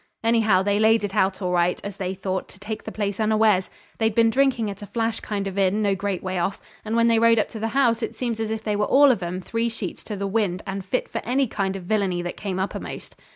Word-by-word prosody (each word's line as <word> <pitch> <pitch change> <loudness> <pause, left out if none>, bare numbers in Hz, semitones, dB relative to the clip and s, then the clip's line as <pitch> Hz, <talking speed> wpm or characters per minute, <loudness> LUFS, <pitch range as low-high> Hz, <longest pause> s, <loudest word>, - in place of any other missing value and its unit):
Anyhow, 220 -5 +3
they 205 +1 +1
laid 220 0 +4
it 200 -1 -3
out 190 +1 +1
all 180 - 0
right, 175 0 +2
as 200 -1 -6
they 190 -1 -3
thought, 190 0 -3
to - - -14
take 215 +2 -5
the 220 - -5
place 205 -2 -3
unawares. 215 -3 +3 0.3
They'd 220 -1 +1
been 230 -1 +4
drinking 255 -3 +2
at 200 +1 -10
a 205 - -7
flash 225 +2 -1
kind 200 -2 -3
of 195 0 -3
inn 200 +2 +2
no 200 -1 +2
great 195 -1 -3
way 185 -1 -2
off, 190 +3 -1 0.2
and 220 +1 -2
when 230 0 +4
they 230 -1 +4
rode 230 0 +5
up 215 - +1
to 220 - -7
the 225 - -1
house 235 -1 +2
it 225 - -3
seems 235 -3 -2
they 220 -1 -2
were 210 0 +1
all 280 0 +6
of 230 - -1
'em 180 +1 -3
three 230 +4 -1
sheets 225 - -6
in 210 - -3
the 200 - -2
wind, 195 -3 0
and 195 0 -4
fit 225 +7 -1
for 230 - -4
any 265 +3 +1
kind 195 -4 -2
of 190 - -6
villainy 185 -3 0
that 175 - -4
came 195 -3 -4
uppermost. 190 +1 -5
210 Hz, 260 wpm, -24 LUFS, 190-225 Hz, 0.3 s, all